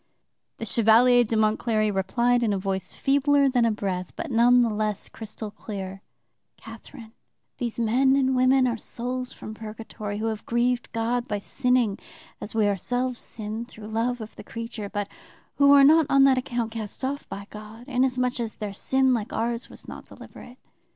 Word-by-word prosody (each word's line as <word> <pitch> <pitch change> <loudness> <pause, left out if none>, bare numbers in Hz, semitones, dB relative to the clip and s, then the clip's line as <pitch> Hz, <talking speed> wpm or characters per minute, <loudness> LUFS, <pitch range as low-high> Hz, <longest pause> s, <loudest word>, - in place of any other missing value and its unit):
"The 225 - -5
Chevalier 235 +3 +5
d'Aumont 220 -1 +1
Cléry 215 -3 +1
replied 235 +6 +1
in 220 -3 +1
a - - 0
voice 190 0 -3
feebler 280 +1 +3
than 250 -3 +2
a 230 - +3
breath, 190 -4 -3
but - - -5
none 245 +1 +5
the 235 - +1
less 210 -1 -2
crystal 215 -1 -8
clear: 195 -2 -7 0.6
"'Catherine, 225 +1 -12 0.5
these 240 -2 -3
men 255 +4 +3
and 265 -1 +2
women 255 +1 +4
are 235 -2 -1
souls 250 +3 -4
from 215 - -9
purgatory 215 -1 -7
who 215 - -3
have 220 -1 -3
grieved 240 +1 0
God 235 +2 -1
by 210 - -1
sinning 250 -1 0 0.4
as 215 - -6
we 215 -2 +3
ourselves 245 +5 -1
sinned 220 +1 -6
through 215 -4 -11
love 230 +2 -1
of 220 - -9
the - - -10
creature, 230 -3 -6
but 205 0 -3 0.5
who 280 0 +6
are 280 -1 +8
not 310 +1 +6
on 275 0 +5
that 265 -1 +5
account 240 -2 -3
cast 225 +3 -5
off 280 +2 -4
by 200 +1 -7
God, 215 +3 -11
inasmuch 255 -1 0
as 230 -2 -3
their 210 -2 -5
sin, 265 +5 +2
like 225 -3 -2
ours, 235 +1 -2
was - - -9
not - - -9
deliberate. 245 +1 -13
230 Hz, 180 wpm, -25 LUFS, 215-250 Hz, 0.6 s, are